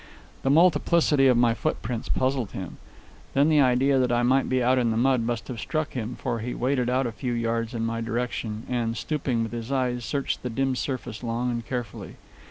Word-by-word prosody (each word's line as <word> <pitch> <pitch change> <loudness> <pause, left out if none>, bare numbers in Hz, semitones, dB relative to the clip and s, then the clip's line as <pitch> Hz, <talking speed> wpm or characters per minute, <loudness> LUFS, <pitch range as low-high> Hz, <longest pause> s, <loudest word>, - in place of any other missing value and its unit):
The 135 - 0
multiplicity 155 -2 +4
of 125 -2 +4
my 120 -1 +4
footprints 115 +1 -3
puzzled 130 -4 0
him. 95 -3 -6 0.6
Then 140 +3 +4
the 150 -2 +5
idea 135 +1 +3
that 125 -1 +2
I 120 0 +2
might 130 +2 +3
be 130 -1 +1
out 130 +1 +3
in 120 -2 +2
the 110 - 0
mud 130 0 +3
must 115 -2 -3
have 120 -3 -6
struck 155 +7 -2
him, 120 -1 -4
for 115 -1 -3
he 120 +3 -4
waded 125 -1 0
out 130 +1 +1
a 120 - -2
few 120 +2 -3
yards 115 0 -1
in 115 0 -1
my 115 0 -2
direction, 115 -2 -3
and, 120 -2 -1
stooping, 135 -6 -1
with 115 - -4
his 120 +1 -5
eyes 125 -2 0
searched 140 +3 -2
the 125 - -3
dim 135 +2 0
surface 125 -4 -4
long 120 +1 -1
and 120 -1 -3
carefully. 125 -3 -5
125 Hz, 210 wpm, -26 LUFS, 115-135 Hz, 0.6 s, the